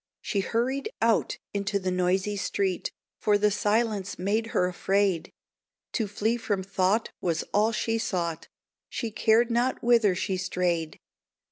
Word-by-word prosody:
She 200 - -2
hurried 255 - -1
out - - +2 0.2
into 200 0 0
the 185 -1 -2
noisy 185 +3 +1
street, 195 -2 -1 0.3
For 210 -1 +3
the 210 0 +3
silence 210 -1 0
made 210 +5 0
her 180 - +1
afraid; 185 -1 0 0.6
To 220 -4 -1
flee 220 +4 0
from 205 -4 -1
thought 195 +3 +1
was 165 -3 0
all 215 +2 +3
she 225 +1 -1
sought, 170 -6 -2 0.4
She 230 -3 -3
cared 225 +2 +3
not 245 +2 +1
whither 230 -5 +4
she 190 +1 -1
strayed. 180 -3 -1
200 Hz, 140 wpm, -27 LUFS, 185-225 Hz, 0.6 s, whither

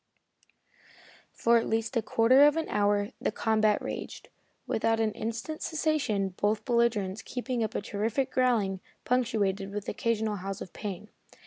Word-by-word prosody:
For 235 0 +3
at 230 - -1
least 225 +3 -1
a 230 - +3
quarter 250 +6 +5
of 295 +2 +2
an 325 - -1
hour 205 0 +1
the - - 0
combat 215 -1 +2
raged, - - -6 0.4
without 225 0 +1
an 220 -1 +1
instant's 230 +9 -4
cessation, 300 -11 0
both 210 +1 0
belligerents 225 -5 +1
keeping 250 -1 -3
up 220 - -3
a - - 0
terrific 225 +6 -1
growling, 225 -7 +1 0.3
punctuated 210 -6 0
with 205 -1 -5
occasional 220 -2 -1
howls 195 +1 -5
of 180 - -9
pain. 210 0 -6
220 Hz, 145 wpm, -29 LUFS, 205-235 Hz, 0.4 s, quarter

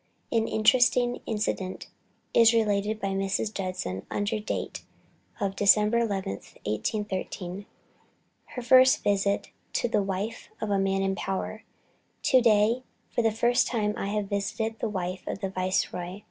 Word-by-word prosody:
An 225 -1 +2
interesting 245 +2 +3
incident 210 -4 -2 0.5
is 230 0 +6
related 210 -1 +1
by 195 - -2
Mrs. 195 +2 -1
Judson 185 - -4
under 205 +1 -1
date 210 - -4 0.6
of 195 -2 -1
Dec. 200 0 +6
11th, 210 - -1
1813, 185 - -3 0.8
her 250 - -7
first 255 +1 +6
visit 200 0 +1 0.2
to - - +1
the 215 -3 +1
wife 200 +3 -4
of 215 - -3
a 200 - +2
man 195 0 +1
in 195 0 +1
power. 195 +3 -4 0.6
"To 255 - +5
day 225 +1 +4 0.3
for - - +1
the 225 - +3
first 240 +3 +2
time 210 -3 0
I - - -3
have 210 0 -1
visited 220 +3 -2
the 230 - -1
wife 185 -2 -3
of - - -3
the 195 -1 -3
Viceroy. 185 0 -2
205 Hz, 145 wpm, -27 LUFS, 195-225 Hz, 0.8 s, is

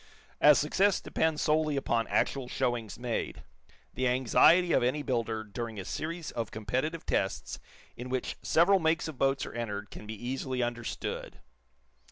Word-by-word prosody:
As 150 -1 +7
success 190 +6 +2
depends 160 -1 0
solely 155 -1 +2
upon 120 -4 0
actual 135 -3 0
showings 120 -4 -2
made, 120 -1 -3 0.5
the 130 - 0
anxiety 130 +8 +5
of - - +4
any 130 +5 0
builder 115 -4 -1
during 110 0 -6
a 95 - -6
series 165 - -4
of 115 -2 -3
competitive 130 +10 -3
tests 95 - -1 0.4
in 125 +1 -7
which 130 0 -2
several 190 +4 +4
makes 160 -1 +1
of 155 -5 -8
boat 135 -1 +2
are - - -8
entered 105 -3 -4
can 105 - -10
be 110 - -5
easily 125 +2 -3
understood. 120 -10 -4
130 Hz, 155 wpm, -30 LUFS, 115-155 Hz, 0.5 s, As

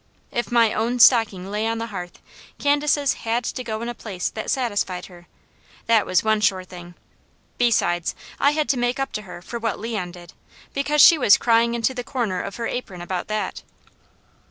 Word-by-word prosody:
If 240 -3 -3
my 230 -2 +4
own 235 +3 -1
stocking 215 -6 +4
lay 210 +2 -1
on 225 0 -1
the 225 - -3
hearth, 175 -2 -6 0.4
Candace's 290 -1 +2
had 235 +2 -1
to 255 - -4
go 220 -1 -4
in - - -4
a 240 - -3
place 195 -6 -4
that 220 - -6
satisfied 205 -8 -1
her 175 -1 -15 0.6
that 225 -2 +3
was 185 - +2
one 220 -1 +2
sure 195 -3 +2
thing. 175 -1 -12 0.6
Besides, 175 -8 +1 0.2
I 280 - +4
had 305 -1 0
to 260 - +1
make 245 +2 0
up 270 - -2
to 210 - -4
her 180 -3 -11
for 235 +5 -6
what 225 -2 -2
Leon 210 -6 -4
did, 175 -1 -13 0.4
because 290 +1 +2
she 325 +1 +8
was 210 -6 +6
crying 235 0 +2
into 235 +2 0
the 250 -1 -5
corner 230 -9 -2
of 200 - -6
her 235 - -4
apron 215 -8 -5
about 175 +1 -4
that. 215 0 -3
225 Hz, 195 wpm, -22 LUFS, 190-245 Hz, 0.6 s, she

